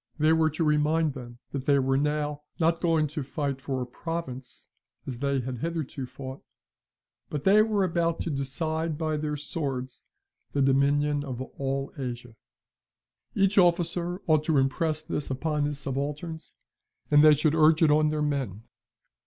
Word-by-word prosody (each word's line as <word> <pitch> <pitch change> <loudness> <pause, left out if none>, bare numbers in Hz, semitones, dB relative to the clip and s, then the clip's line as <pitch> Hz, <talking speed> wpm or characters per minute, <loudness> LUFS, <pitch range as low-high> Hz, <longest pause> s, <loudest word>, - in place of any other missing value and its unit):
They 155 0 +4
were 160 -1 +3
to 160 +2 -2
remind 150 0 +2
them 120 -2 -9
that 140 0 -5
they 140 -1 +5
were 135 0 +2
now 150 +1 -1 0.2
not 165 0 +2
going 165 -3 +2
to 155 +1 -4
fight 140 0 -3
for 135 -2 -2
a - - -5
province, 130 -2 -6 0.4
as 125 -3 -6
they 140 -1 0
had 125 -1 -5
hitherto 155 -4 -3
fought, 130 +1 -8 0.9
but 145 -2 -4
they 205 +2 +6
were 215 -2 +2
about 170 -2 0
to 165 - -2
decide 155 +3 -2
by 155 -1 -1
their 150 0 -2
swords 135 -4 -5 0.5
the 140 - +1
dominion 145 +2 +2
of 130 -4 -5
all 135 +1 -3
Asia. 120 -2 -5 1.0
Each 195 +1 +3
officer 175 +1 +1
ought 155 -3 +3
to 160 -3 +2
impress 155 +3 0
this 155 -2 -4
upon 150 +2 -1
his 145 -1 -3
subalterns 145 +4 -5 0.6
and 145 0 +7
they 155 -1 +8
should 150 +1 +2
urge 160 0 +5
it 155 - +5
on 155 +1 +4
their 150 0 -1
men. 130 -9 -2
150 Hz, 160 wpm, -27 LUFS, 135-160 Hz, 1.0 s, they